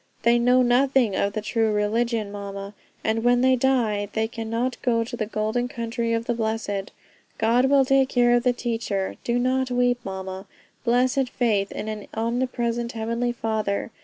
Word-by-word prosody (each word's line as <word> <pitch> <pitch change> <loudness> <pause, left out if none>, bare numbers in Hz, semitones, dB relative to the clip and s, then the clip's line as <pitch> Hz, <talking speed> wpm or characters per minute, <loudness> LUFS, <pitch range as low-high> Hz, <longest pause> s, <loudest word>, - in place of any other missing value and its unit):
They 235 +1 +4
know 250 +1 +4
nothing 245 -3 +3
of 200 +1 0
the 215 - -2
true 225 0 +1
religion, 215 +1 0
mama; 200 0 -7 0.3
and 225 +1 0
when 245 0 +4
they 260 0 +4
die 235 -6 +1
they 220 0 0
cannot 230 +2 -3
go 230 -2 +1
to 240 +2 -6
the 215 -3 -3
golden 220 +3 -1
country 235 -1 -3
of 230 0 -1
the 240 - 0
blessed. 220 -3 -2 0.5
God 235 +3 +3
will 275 0 +4
take 270 0 +3
care 240 -1 +3
of 240 - +3
the 250 0 +3
teacher; 225 -5 -3
do 235 0 0
not 260 +1 +1
weep, 245 0 +2
mama." 190 0 -6 0.4
Blessed 250 +2 +2
faith 210 -6 0
in - - -5
an 215 -1 -5
omnipresent 235 0 -1
Heavenly 230 +2 -1
Father! 220 -2 -2
235 Hz, 170 wpm, -24 LUFS, 215-245 Hz, 0.5 s, They